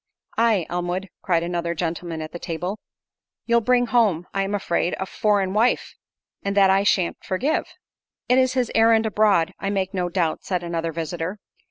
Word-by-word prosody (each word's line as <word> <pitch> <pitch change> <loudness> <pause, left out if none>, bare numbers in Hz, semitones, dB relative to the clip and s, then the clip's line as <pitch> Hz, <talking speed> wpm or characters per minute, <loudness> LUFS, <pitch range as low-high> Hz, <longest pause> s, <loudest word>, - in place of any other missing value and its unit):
"Aye, 225 -7 +2
Elmwood," 175 +2 -3
cried 170 -3 +1
another 170 0 -2
gentleman 165 -1 -3
at 155 - -8
table, 180 +4 -4 0.7
"you'll 235 0 +3
bring 245 +2 +3
home, 215 -9 +2
I 195 - 0
am 195 +1 -1
afraid, 175 -3 0
a 190 - -2
foreign 200 -1 +1
wife, 225 +4 +1 0.5
and 200 0 -2
that 195 -1 +6
I 195 +1 +4
shan't 190 -3 +1
forgive." 245 +11 0 0.6
"It 250 +1 +4
is 255 -1 +2
his 255 -3 0
errand 225 0 +4
abroad, 200 -5 +2
I 195 - -2
make 195 -1 -1
no 180 -2 -1
doubt," 170 -3 -1
said 180 -2 -2
another 165 -1 -2
visitor. 165 +4 -4
190 Hz, 170 wpm, -23 LUFS, 170-215 Hz, 0.7 s, that